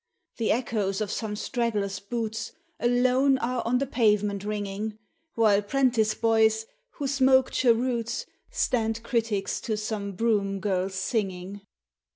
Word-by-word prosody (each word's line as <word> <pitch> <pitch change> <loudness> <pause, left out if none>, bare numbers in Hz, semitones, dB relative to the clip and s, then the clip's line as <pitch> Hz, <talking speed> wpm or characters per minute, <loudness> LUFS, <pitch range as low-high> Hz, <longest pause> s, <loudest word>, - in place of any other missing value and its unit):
The 225 - +1
echoes 215 -5 0
of 215 -2 -2
some 215 -2 -3
straggler's 210 -4 -1
boots 225 +1 -4 0.3
Alone 255 +3 +3
are 250 0 -1
on 250 +2 +3
the 275 - 0
pavement 210 -6 +1
ringing 210 +1 -3 0.4
While 210 -3 +4
'prentice 230 -1 +2
boys, 220 -1 +3 0.3
who 285 - -5
smoke 265 -1 +4
cheroots, 235 -1 +1 0.2
Stand 230 - 0
critics 225 -5 -1
to 215 -2 -2
some 210 -2 -3
broom 200 -2 0
girl's 190 -1 -1
singing. 190 -1 -2
220 Hz, 125 wpm, -27 LUFS, 205-240 Hz, 0.4 s, While